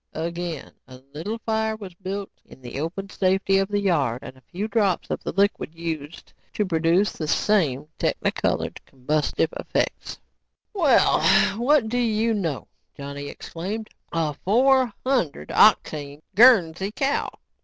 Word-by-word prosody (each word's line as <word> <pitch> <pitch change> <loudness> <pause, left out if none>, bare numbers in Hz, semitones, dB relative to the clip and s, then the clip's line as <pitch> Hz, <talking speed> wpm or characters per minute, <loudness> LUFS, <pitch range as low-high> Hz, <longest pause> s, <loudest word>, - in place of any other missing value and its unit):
Again, 170 -1 -4 0.2
a 130 0 -12
little 190 +10 -4
fire 220 0 0
was 200 -4 -9
built 195 +2 -5
in - - -16
the 125 +2 -6
open 180 +6 -4
safety 195 0 +2
of 195 - 0
the 205 0 -1
yard 145 -11 0
and - - -9
a 130 - -20
few 190 - -5
drops 205 -5 0
of - - -2
the - - -3
liquid 195 -5 0
used 160 -2 -6 0.2
to 210 - 0
produce 170 +3 +2
the 155 - -5
same 150 -7 +1
technicolored, - - -1
combustive 150 +4 -1
effects. - - -2 0.6
"Well, 320 - +4 0.4
what 260 -1 +3
do 245 +3 -1
you 225 -1 +1
know," 170 -10 -3 0.3
Johnny 140 0 -6
exclaimed, 205 +9 -6 0.2
"a 160 -3 -1
four 250 - +3
hundred 200 - -1
octane 145 0 +3
Guernsey 195 -5 +5
cow!" 275 +5 -1
185 Hz, 140 wpm, -24 LUFS, 155-215 Hz, 0.6 s, Guernsey